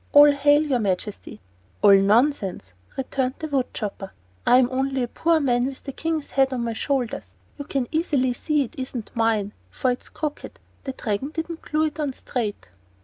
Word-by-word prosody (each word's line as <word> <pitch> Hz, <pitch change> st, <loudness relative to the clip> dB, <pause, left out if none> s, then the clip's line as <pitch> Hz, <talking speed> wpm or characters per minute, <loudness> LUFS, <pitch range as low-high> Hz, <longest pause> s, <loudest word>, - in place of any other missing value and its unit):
All 290 Hz, 0 st, +9 dB
hail, 290 Hz, +1 st, +4 dB
your 275 Hz, -5 st, +1 dB
Majesty!" 195 Hz, -, -3 dB, 0.4 s
"All 200 Hz, -1 st, +9 dB
nonsense!" 195 Hz, -, +2 dB, 0.2 s
returned 265 Hz, 0 st, -1 dB
the 315 Hz, -, -4 dB
wood 275 Hz, -4 st, -1 dB
chopper. 200 Hz, -2 st, -5 dB, 0.3 s
"I 250 Hz, -, +7 dB
am 255 Hz, -1 st, +5 dB
only 265 Hz, 0 st, 0 dB
a -, -, -1 dB
poor 330 Hz, +6 st, +2 dB
man 245 Hz, -3 st, +2 dB
with 270 Hz, -1 st, -8 dB
the 275 Hz, -, -5 dB
King's 320 Hz, +1 st, -3 dB
head 270 Hz, -1 st, +3 dB
on 250 Hz, -2 st, -2 dB
my 230 Hz, -1 st, -2 dB
shoulders. 235 Hz, -, -2 dB, 0.3 s
You 285 Hz, -, -5 dB
can 270 Hz, -4 st, -1 dB
easily 285 Hz, -6 st, +1 dB
see 300 Hz, +3 st, 0 dB
it 240 Hz, -, -9 dB
isn't 255 Hz, -4 st, -5 dB
mine, 220 Hz, -3 st, +1 dB, 0.2 s
for 255 Hz, -, 0 dB
it's 245 Hz, -, -5 dB
crooked; 300 Hz, -1 st, -5 dB, 0.3 s
the 265 Hz, -, -3 dB
Dragon 225 Hz, +3 st, -2 dB
didn't 325 Hz, +1 st, -5 dB
glue 305 Hz, +1 st, 0 dB
it 310 Hz, 0 st, -4 dB
on 290 Hz, -3 st, -1 dB
straight." 220 Hz, -, -4 dB
260 Hz, 185 wpm, -24 LUFS, 230-290 Hz, 0.4 s, All